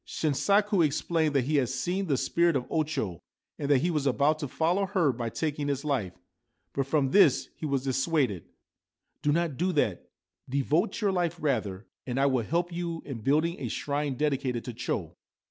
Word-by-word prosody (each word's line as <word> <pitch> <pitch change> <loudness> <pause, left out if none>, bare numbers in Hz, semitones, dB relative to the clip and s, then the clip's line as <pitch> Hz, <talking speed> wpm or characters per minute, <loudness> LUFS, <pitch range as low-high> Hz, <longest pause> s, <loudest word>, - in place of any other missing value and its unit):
Shinsaku 200 +6 +2
explained 155 0 +1
that 135 - +3
he 150 +4 +1
had 130 -4 +2
seen 190 +2 -2
the 140 -4 +1
spirit 170 +3 +2
of 125 -2 0
O 160 - +2
Cho, 135 - -3 0.4
and 145 - -2
that 145 - +6
he 175 - +1
was 150 -3 0
about 145 +4 +2
to 145 - -3
follow 175 +8 +1
her 185 -7 +2
by 120 -1 -4
taking 150 +3 -2
his 140 0 -2
life; 125 -11 -1 0.6
but 135 -1 -1
from 135 -2 +1
this 195 -9 +5
he 155 - -4
was 135 -2 0
dissuaded. 135 - +1
4 - - -30 0.7
Do 145 - +2
not 165 -3 0
do 180 +3 +1
that; 110 - 0 0.4
devote 145 - 0
your 205 -2 +2
life, 175 -2 0
rather, 110 - -1 0.2
and 125 +1 -1
I 135 - +4
will 130 -4 +2
help 170 +8 0
with 170 - -5
you 170 -2 -3
in 130 -6 -6
building 155 +8 +1
a 130 - -3
shrine 145 +3 -2
dedicated 135 -4 -1
to 125 - -5
Cho. - - -3
145 Hz, 195 wpm, -28 LUFS, 130-170 Hz, 0.7 s, that